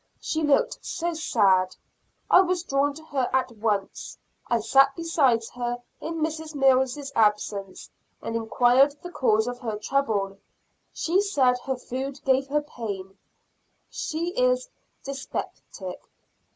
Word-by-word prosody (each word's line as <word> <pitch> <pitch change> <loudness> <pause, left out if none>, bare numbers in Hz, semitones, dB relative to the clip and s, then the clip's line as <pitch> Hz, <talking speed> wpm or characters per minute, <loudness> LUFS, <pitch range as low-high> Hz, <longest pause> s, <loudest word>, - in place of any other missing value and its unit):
She 315 - -2
looked 295 -2 +2
so 345 0 -2
sad, 195 - +2 0.5
I 365 - +7
was 365 -2 0
drawn 280 -2 +1
to 315 - -11
her 270 -5 -1
at 260 -1 +1
once. 210 -3 -2 0.3
I 235 - +2
sat 270 +5 +4
beside 285 -9 +2
her 245 0 -2 0.2
in 325 0 -4
Mrs. 315 0 -3
Mills' 270 0 +2
absence, 210 -3 0 0.3
and 230 - -5
enquired 245 +5 +3
the 355 - -7
cause 220 -8 +2
of 245 0 -4
her 225 -4 -3
trouble; 210 -5 -1 0.5
she 360 +4 +1
said 265 -11 +2
her 265 - -1
food 265 +2 -5
gave 270 0 +2
her 295 +2 0
pain 200 -8 -6 0.8
she 330 +2 -3
is - - +1 0.4
dyspeptic. 270 -8 -6
265 Hz, 130 wpm, -26 LUFS, 225-305 Hz, 0.8 s, I